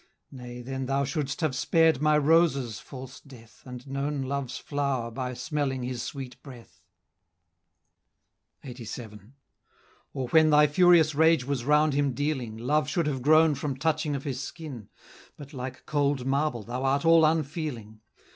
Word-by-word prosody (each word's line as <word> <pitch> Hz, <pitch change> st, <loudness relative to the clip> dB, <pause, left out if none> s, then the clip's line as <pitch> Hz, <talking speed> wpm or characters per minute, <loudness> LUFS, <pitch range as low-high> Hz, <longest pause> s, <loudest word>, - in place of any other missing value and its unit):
Nay, 125 Hz, -2 st, -9 dB
then 130 Hz, +1 st, -4 dB
thou 135 Hz, +1 st, +1 dB
should'st 145 Hz, +2 st, -3 dB
have 155 Hz, -5 st, 0 dB
spared 160 Hz, -1 st, +3 dB
my 150 Hz, 0 st, +4 dB
roses, 145 Hz, -6 st, +2 dB
false 130 Hz, -1 st, -10 dB
Death, 120 Hz, -6 st, -17 dB
And 125 Hz, -1 st, -9 dB
known 140 Hz, +1 st, -3 dB
Love's 135 Hz, -1 st, -3 dB
flow'r 140 Hz, -5 st, -2 dB
by 125 Hz, 0 st, -4 dB
smelling 135 Hz, 0 st, -2 dB
his 125 Hz, -1 st, -4 dB
sweet 130 Hz, -2 st, -7 dB
breath;" 125 Hz, -5 st, -14 dB, 1.8 s
LXXXVII. 115 Hz, -3 st, -9 dB, 0.8 s
"Or, 130 Hz, -2 st, -3 dB
when 155 Hz, -1 st, +5 dB
thy 150 Hz, 0 st, +6 dB
furious 160 Hz, 0 st, +4 dB
rage 160 Hz, -2 st, +3 dB
was 135 Hz, -3 st, -3 dB
round 150 Hz, +1 st, +3 dB
him 140 Hz, -1 st, +1 dB
dealing, 130 Hz, -5 st, -3 dB
Love 150 Hz, +6 st, 0 dB
should 170 Hz, -1 st, 0 dB
have 140 Hz, -4 st, -2 dB
grown 155 Hz, +3 st, +5 dB
from 140 Hz, -1 st, -4 dB
touching 155 Hz, 0 st, 0 dB
of 135 Hz, -, -5 dB
his 135 Hz, -2 st, -4 dB
skin; 135 Hz, -, -8 dB, 0.5 s
But 145 Hz, 0 st, -11 dB
like 130 Hz, -1 st, -7 dB
cold 140 Hz, -3 st, 0 dB
marble 135 Hz, -3 st, 0 dB
thou 125 Hz, +4 st, -5 dB
art 140 Hz, +3 st, +1 dB
all 165 Hz, 0 st, +6 dB
unfeeling. 150 Hz, -8 st, -2 dB
140 Hz, 150 wpm, -27 LUFS, 125-150 Hz, 1.8 s, thy